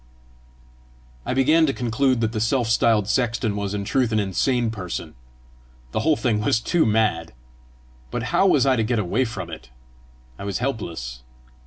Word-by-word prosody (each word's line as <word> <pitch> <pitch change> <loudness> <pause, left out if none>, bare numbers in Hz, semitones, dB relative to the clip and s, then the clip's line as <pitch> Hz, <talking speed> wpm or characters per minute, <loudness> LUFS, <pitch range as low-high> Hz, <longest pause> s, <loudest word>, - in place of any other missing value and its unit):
'" 60 0 -29
I - - -1
began 155 +5 +4
to 135 - 0
conclude 125 0 0
that 110 -1 0
the 110 - -3
self 115 +2 +1
styled 110 -3 +3
sexton 120 -2 0
was 100 0 -3
in 100 -1 -3
truth 125 +1 +1
an 110 - +2
insane 115 +4 0
parson: 95 -5 -6 0.8
the - - -1
whole 155 0 +3
thing 115 -6 0
was 110 +1 +2
too 165 +5 +1
mad! 105 - +1 0.8
But - - -3
how 195 - +4
was 145 -7 +4
I 135 -1 +4
to 115 - +1
get 120 +2 0
away 105 +6 0
from 95 -7 -6
it? 80 -5 -10 0.7
I - - -6
was 100 -1 -2
helpless! 85 - -4
110 Hz, 175 wpm, -23 LUFS, 95-125 Hz, 0.8 s, began